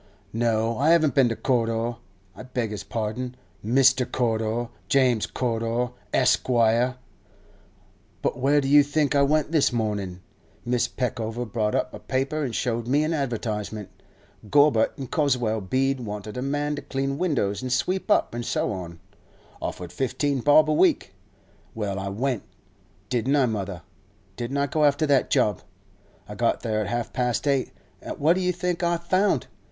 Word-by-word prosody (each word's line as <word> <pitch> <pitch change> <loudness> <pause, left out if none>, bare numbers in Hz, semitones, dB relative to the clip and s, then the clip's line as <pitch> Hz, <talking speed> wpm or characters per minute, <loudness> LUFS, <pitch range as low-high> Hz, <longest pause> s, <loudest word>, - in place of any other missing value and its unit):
'No, 115 0 0
I 145 +3 +3
haven't 160 -3 +4
been 135 -4 +4
to 115 - -2
Corder—I 115 -6 -3
beg 125 -3 -3
his 105 -1 -5
pardon; 115 +4 -4 0.3
Mister 130 +3 +4
Corder—James 120 +1 0
Corder, 120 0 -1 0.2
Esquire. 120 -1 +3 1.3
But - - -1
where 145 +3 +3
do 135 - -2
you 145 +1 +7
think 145 +1 0
I 140 - +4
went 150 +2 +2
this 155 -5 +3
mornin'? 105 -6 -2 0.5
Mrs. 120 -1 0
Peckover 120 -1 -2
brought 110 -1 -1
up 125 - -1
a - - -8
paper 135 +3 -1
an' 130 - -2
showed 120 -1 -1
me 145 +4 +3
an 155 +2 0
advertisement. 110 - -3 0.6
Gorbutt 145 -5 +4
in 135 - -5
Goswell 125 -6 0
Bead 130 +7 0
wanted 105 -2 -6
a 125 - -3
man 145 +2 -1
to - - -4
clean 135 +1 -3
windows 130 - 0
an' 130 - -4
sweep 180 - -1
up, 205 - +3
an' 120 - -3
so 120 - -1
on;—offered 90 -1 -9
fifteen 135 +1 -1
bob 145 +4 +5
a 155 - +2
week. - - +2 0.6
Well, 100 -3 -2
I 100 0 -3
went. 120 +2 -1 0.7
Didn't 130 +3 +1
I, 140 -3 +4
mother? 100 -6 -4 0.5
Didn't 120 +3 -3
I 140 - +2
go 150 +2 0
after 145 +1 +3
that 140 -3 +2
job? 105 -3 +2 0.7
I - - -7
got - - 0
there 110 -2 -1
at 105 - -3
half 120 +1 -3
past 125 +2 -1
eight; 135 -2 +1 0.3
an' - - -5
what 155 +4 +3
do 185 - -1
you 180 0 +1
think 180 0 -2
I 170 0 +1
found? 185 +4 +1
125 Hz, 160 wpm, -25 LUFS, 110-140 Hz, 1.3 s, you